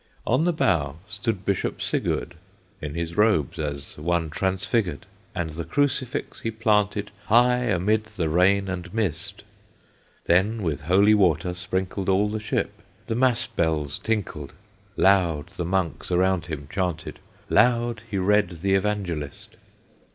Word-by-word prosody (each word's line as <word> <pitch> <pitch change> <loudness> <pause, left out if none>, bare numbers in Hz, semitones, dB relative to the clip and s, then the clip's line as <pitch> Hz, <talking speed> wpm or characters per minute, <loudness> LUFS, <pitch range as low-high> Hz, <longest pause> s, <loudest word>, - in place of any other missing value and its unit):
On 130 +7 +2
the 175 - +3
bow 85 - +1
stood 105 -2 -3
Bishop 100 -2 -1
Sigurd, 85 - -1 0.5
In 75 0 -5
his 85 0 -3
robes, 105 - +2
as 70 -1 -5
one 80 0 0
transfigured, 95 - -1 0.3
And 85 -3 -2
the 80 +2 -5
Crucifix 130 - -1
he 115 - -2
planted 105 -2 +1
High 125 +2 +4
amid 105 +1 +1
the 105 -6 -3
rain 95 +5 +3
and 95 -1 -5
mist. 95 -8 -2 0.8
Then 100 +5 +2
with 80 -6 -1
holy 95 +7 +4
water 90 -4 +2
sprinkled 95 +2 -3
All 100 +2 +3
the 110 +1 -3
ship; 105 -1 -2 0.2
the - - -2
mass 120 0 +2
bells 75 -4 -1
tinkled; 100 -10 -3 0.4
Loud 90 -5 +3
the 90 -2 -5
monks 90 -2 -1
around 90 0 +2
him 75 -4 -5
chanted, 90 -4 -3 0.3
Loud 120 -2 +3
he 100 - -2
read 100 0 +3
the 100 0 +2
Evangelist. 95 -7 -2
95 Hz, 135 wpm, -25 LUFS, 85-105 Hz, 0.8 s, High